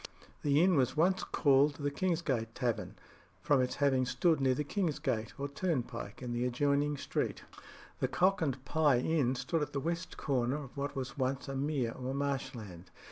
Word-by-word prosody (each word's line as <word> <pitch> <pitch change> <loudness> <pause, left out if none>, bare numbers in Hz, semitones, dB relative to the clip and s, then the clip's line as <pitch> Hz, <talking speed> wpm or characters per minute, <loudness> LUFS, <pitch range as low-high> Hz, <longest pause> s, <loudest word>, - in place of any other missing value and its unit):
The 145 +2 +4
inn 180 -3 +4
was 130 +1 +1
once 185 +4 +3
called 140 0 +3
the 145 0 -2
Kingsgate 140 -9 -1
Tavern, 120 -4 -2 0.4
from 145 -3 +3
its 125 - -1
having 135 -3 +2
stood 140 +5 +2
near 130 -1 +3
the 150 - -1
king's 165 0 -1
gate 125 -7 -2
or 140 - -1
turnpike 140 -4 -3
in 125 - -4
the 120 +1 -1
adjoining 140 +3 +1
street. - - -2 0.6
The - - +1
Cock 190 +1 +2
and 135 -4 -1
Pye 150 -2 +3
Inn 135 -1 +1
stood 165 +5 -1
at 145 0 -3
the 140 - 0
west 170 +5 -3
corner 130 -1 0
of 135 - -12
what 140 0 -3
was 130 0 -5
once 130 +2 -1
a 135 - -4
mere 135 -4 0
or 130 +2 -4
marshland. 130 -10 -4
140 Hz, 185 wpm, -32 LUFS, 125-150 Hz, 0.6 s, The